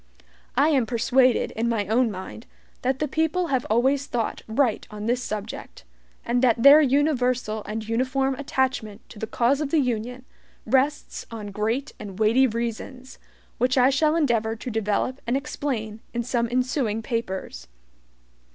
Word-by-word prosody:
I 285 +4 +5
am 265 -7 +2
persuaded 250 +2 +2
in 230 +2 -1
my 220 -3 0
own 230 +4 +2
mind 190 +3 -8 0.3
that 260 +1 0
the 300 - -1
people 320 +4 0
have 260 -2 0
always 265 +5 +2
thought 235 -4 -2
right 230 0 0
on 210 0 -7
this 245 +2 0
subject, 210 - -6 0.4
and 245 +1 +1
that 235 -2 +3
their 285 +2 +9
universal 255 -6 +1
and 215 0 -5
uniform 265 +4 0
attachment 260 -6 -2
to 210 - -12
the 220 - -4
cause 250 +6 +1
of 295 - -2
the 320 - +2
Union 250 0 -2 0.4
rests 270 +5 0
on 215 -3 -7
great 225 +8 -2
and 200 -3 -8
weighty 225 +5 +4
reasons, 235 +3 -5 0.4
which 255 +2 +2
I 255 +1 +5
shall 305 +3 +2
endeavor 230 -8 +1
to 240 +2 -6
develop 225 +4 -1
and 245 +3 +2
explain 265 -7 -4 0.2
in 235 - 0
some 235 -1 -1
ensuing 250 -3 0
papers. 190 - -4
245 Hz, 155 wpm, -24 LUFS, 220-270 Hz, 0.4 s, their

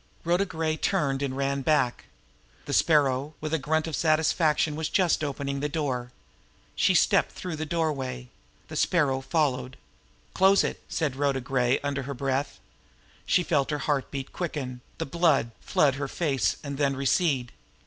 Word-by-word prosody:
Rhoda 175 +4 +2
Gray 160 -3 -2
turned 145 -8 0
and 135 -2 -2
ran 140 0 0
back. 130 -4 +1 0.6
The - - -4
Sparrow, 145 -2 +2
with 155 0 -4
a 160 - +2
grunt 155 +3 0
of 160 -3 -3
satisfaction, 155 0 +2
was 160 0 -2
just 180 -5 +2
opening 140 -1 -3
the 150 +1 -1
door. 130 -6 -2 0.6
She - - +3
stepped - - +3
through 175 -4 -5
the 155 0 -4
doorway. 135 -7 -2 0.4
The 155 - -8
Sparrow 145 -5 +2
followed. 135 -4 -1 0.6
"Close 195 +1 +5
it!" - - -3
said 150 -5 -1
Rhoda 140 -1 +1
Gray, 125 -1 +1
under 140 0 -2
her 140 +1 -5
breath. 135 +2 -2 0.7
She 180 - +3
felt 145 -5 +1
her 150 - 0
heart 145 -1 -1
beat 135 -1 -6
quicken, 135 -8 -4 0.2
the - - -2
blood 155 -6 +2
flood 145 -3 +2
her 140 - -1
face 135 - 0
and 140 -1 -5
then 140 -2 +2
recede. 135 -2 +1
145 Hz, 160 wpm, -27 LUFS, 135-160 Hz, 0.7 s, Close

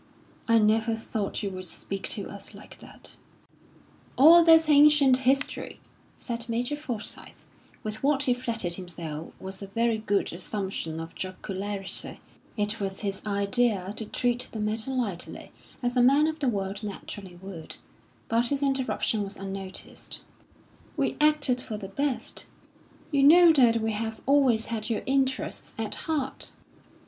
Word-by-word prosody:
"I 230 -1 +5
never 220 +1 +3
thought 220 -2 -4
you 200 - -2
would 185 0 -5
speak 195 +3 -5
to - - -3
us - - -7
like - - -13
that." - - -13 1.0
"All 330 +5 +9
that's 325 -1 +7
ancient 290 -3 +6
history," 265 +2 0 0.4
said 235 0 -5
Major 245 +5 -1
Forsyth, 250 -8 -6 0.4
with 215 0 -4
what 280 0 +2
he 255 - +3
flattered 230 -8 -3
himself 165 -3 -7
was 190 +1 -6
a 200 - -6
very 230 +2 +1
good 205 -4 0
assumption 185 -3 -4
of 165 0 -7
jocularity. 195 +1 -5 0.4
It 210 +1 -1
was 195 -1 -4
his 200 -2 -3
idea 200 -1 +1
to 220 - -4
treat 245 +3 -1
the 220 - -5
matter 220 +3 -1
lightly, 235 -10 -4 0.3
as 245 +1 0
a 250 - +4
man 275 +5 +5
of 315 0 -2
the 275 -3 +1
world 195 -2 -3
naturally 195 -2 -7
would. 185 -4 -9 0.5
But 230 +2 +2
his 280 +2 0
interruption 265 -5 0
was 200 0 -5
unnoticed. 195 -1 -7 0.8
"We 280 - 0
acted 295 -5 +3
for 215 - -5
the 195 -2 -7
best. 275 +5 -2 0.6
You 280 -2 +3
know 330 +4 +8
that 240 -6 +5
we 220 0 -1
have 220 +1 -3
always 265 -5 +4
had 220 -1 -4
your 225 - -1
interests 265 -1 -1
at - - -3 0.2
heart." 280 -3 -2
225 Hz, 150 wpm, -27 LUFS, 195-265 Hz, 1.0 s, All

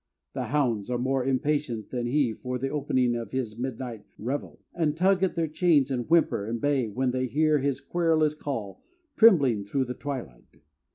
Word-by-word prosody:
The 130 - -3
hounds 120 -5 0
are 125 - 0
more 130 +1 0
impatient 135 -4 -1
than 120 -2 -2
he 130 -2 +1
for 125 +2 -4
the 135 +2 -2
opening 130 -4 +1
of 115 -3 -4
his 120 -3 -4
midnight 125 -3 -5
revel, 135 +6 -4
and 155 -3 0
tug 185 +2 +3
at 190 -2 +1
their 165 -1 0
chains 155 -3 +2
and 125 0 -2
whimper 165 -10 +3
and 115 +1 -3
bay 140 -2 +1
when 125 +4 -1
they 130 0 -1
hear 155 +3 +2
his 140 -1 -1
querulous 160 -3 +1
call 130 -10 -5 0.3
trembling 140 - +5
through 130 +7 -1
the 125 - -4
twilight. 125 - -8
130 Hz, 180 wpm, -27 LUFS, 120-150 Hz, 0.3 s, trembling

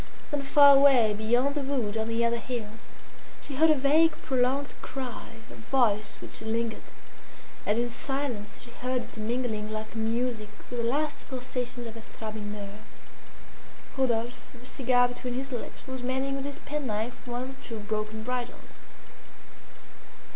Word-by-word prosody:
Then 290 -1 0
far 280 0 +8
away, 260 -6 +6
beyond 240 +6 +2
the 290 - -1
wood, 260 -6 -1
on 220 0 0
the 230 +1 +2
other 235 0 +2
hills, 225 -2 -5 0.6
she 275 - -5
heard 320 +2 +6
a 310 - +7
vague 300 +4 +5
prolonged 265 +2 +1
cry, 260 -3 -5 0.2
a - - -9
voice 225 -4 +1
which - - -7
lingered, 225 0 -1 0.9
and 210 - +3
in 240 +1 +2
silence 245 -4 -3
she 240 - -12
heard 255 0 -1
it - - -13
mingling 220 -1 -1
like 215 +1 -5
music 225 -1 0 0.2
with 245 - -2
the 230 - +1
last 295 +3 -1
pulsations 250 -1 -3
of 225 - -6
her 230 - -9
throbbing 215 -2 -6
nerves. 205 -1 -6 1.2
Rodolphe, 245 -1 -1
a 250 - -14
cigar 250 -1 +3
between 245 0 -4
his 270 +1 -3
lips, 245 - -6
was 260 -1 -5
mending 265 +2 0
with 275 0 -3
his 285 0 -5
penknife 250 -7 -3
one 245 +1 -2
of 265 +1 -6
the - - -16
two 230 - -5
broken 215 +1 -3
bridles. 250 0 -4
245 Hz, 160 wpm, -29 LUFS, 220-265 Hz, 1.2 s, far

